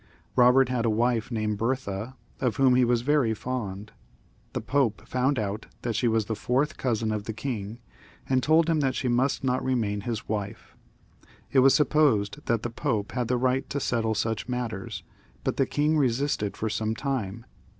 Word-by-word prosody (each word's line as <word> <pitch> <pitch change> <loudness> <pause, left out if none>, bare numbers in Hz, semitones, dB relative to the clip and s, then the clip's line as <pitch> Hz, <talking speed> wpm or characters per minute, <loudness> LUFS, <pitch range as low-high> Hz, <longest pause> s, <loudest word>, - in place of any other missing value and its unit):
Sobert 125 +1 +5
had 125 -2 0
a 115 - +2
wife 115 +1 +1
named 110 -3 -2
Bertha, 115 -1 -2 0.2
of 125 -5 0
whom 130 -1 +4
he 125 0 +4
was 120 -1 +2
very 135 -5 +2
fond. 105 -4 -5 0.6
The - - -1
Pope 130 -5 0
found 130 +2 +1
out 105 0 -3 0.2
that 120 -2 -1
she 120 - +1
was 110 -2 +2
the 110 - -2
fourth 135 +7 0
cousin 115 -3 -1
of 105 -1 -3
the 110 - -4
king, 110 -3 -4 0.5
and 130 -1 +2
told 160 +3 +4
him 165 -2 +2
that 135 -3 +1
she 130 - -1
must 125 +3 +1
not 130 -1 0
remain 110 -6 0
his 115 0 -4
wife. 105 0 -5 0.8
It 135 - +4
was 135 +1 +6
supposed 130 -9 +2
that 115 -1 +1
the 120 - -3
Pope 115 -5 -2
had 125 -2 -2
the 125 +1 +1
right 130 +2 0
to 140 - -2
settle 115 -4 0
such 110 +2 -2
matters, 120 -6 -4 0.4
but - - -1
the 135 - +2
king 150 +1 +1
resisted 130 -5 0
for 110 - -2
some 110 +1 -1
time. 115 -5 -3
120 Hz, 185 wpm, -27 LUFS, 110-130 Hz, 0.8 s, was